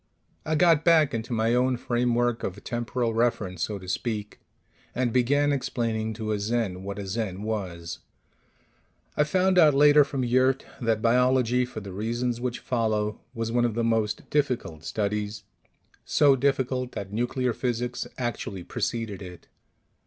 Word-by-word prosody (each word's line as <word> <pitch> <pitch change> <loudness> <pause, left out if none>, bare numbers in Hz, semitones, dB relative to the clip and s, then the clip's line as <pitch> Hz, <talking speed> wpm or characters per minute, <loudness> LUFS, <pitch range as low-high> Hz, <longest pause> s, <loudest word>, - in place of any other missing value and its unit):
I 155 - +1
got 165 -1 +4
back 160 -4 +4
into 115 +2 -4
my 115 0 +1
own 125 +1 +2
framework 120 0 0
of 100 +2 -5
temporal 120 0 -2
reference, 110 -6 0
so 105 +3 -1
to 95 -1 -11
speak, 105 +1 -3 0.6
and 125 -2 0
began 145 +4 +3
explaining 115 -5 -1
to 110 -1 -3
a 105 - 0
Zen 105 -3 -1
what 100 +1 -6
a 100 - -5
Zen 100 -1 -3
was. 90 -6 -4 1.2
(I 150 - +4
found 185 +4 +2
out 150 -4 +6
later 145 +1 +7
from 135 -2 -3
Yurt 130 +2 +2 0.2
that 115 -2 0
biology, 125 +1 +3
for 115 -3 -8
the 100 -2 -8
reasons 120 +4 -2
which 125 -1 -2
follow, 110 -3 -1 0.2
was 115 0 -2
one 120 0 +2
of 120 -3 0
the 115 - 0
most 110 -2 0
difficult 125 - -1
studies; 105 +1 -2 0.6
so 145 -2 +4
difficult 130 -1 0
that 100 0 -6
nuclear 125 +2 0
physics 120 0 -2
actually 120 -6 -4
preceded 110 +1 -3
it!) 90 -2 -11
120 Hz, 155 wpm, -26 LUFS, 105-130 Hz, 1.2 s, later